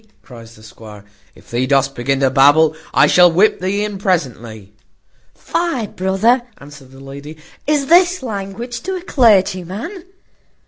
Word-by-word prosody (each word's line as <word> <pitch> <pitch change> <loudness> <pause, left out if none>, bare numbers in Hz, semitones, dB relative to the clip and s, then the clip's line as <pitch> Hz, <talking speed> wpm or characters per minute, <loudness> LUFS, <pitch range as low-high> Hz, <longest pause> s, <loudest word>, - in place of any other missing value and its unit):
cries 115 -3 -14
the 110 - -18
squire: 110 -2 -14 0.3
"if - - -20
thee 125 +2 -1
dost 135 0 +1
begin 135 +2 -2
to 135 -1 +2
babble, 145 +3 +4 0.2
I - - +4
shall 180 -1 +5
whip 190 +6 +2
thee 200 +3 -2
in 205 -2 -6
presently." 120 - -3 0.6
"Fie, 335 -9 -3
brother," 195 +6 0 0.2
answered 140 -2 -15
the 135 0 -16
lady, 140 +3 -11 0.3
"is 295 -2 +1
this 355 +1 +3
language 225 +2 -6
to 380 +2 -4
a 360 - -7
clergyman? 215 - 0
180 Hz, 145 wpm, -17 LUFS, -, 0.6 s, shall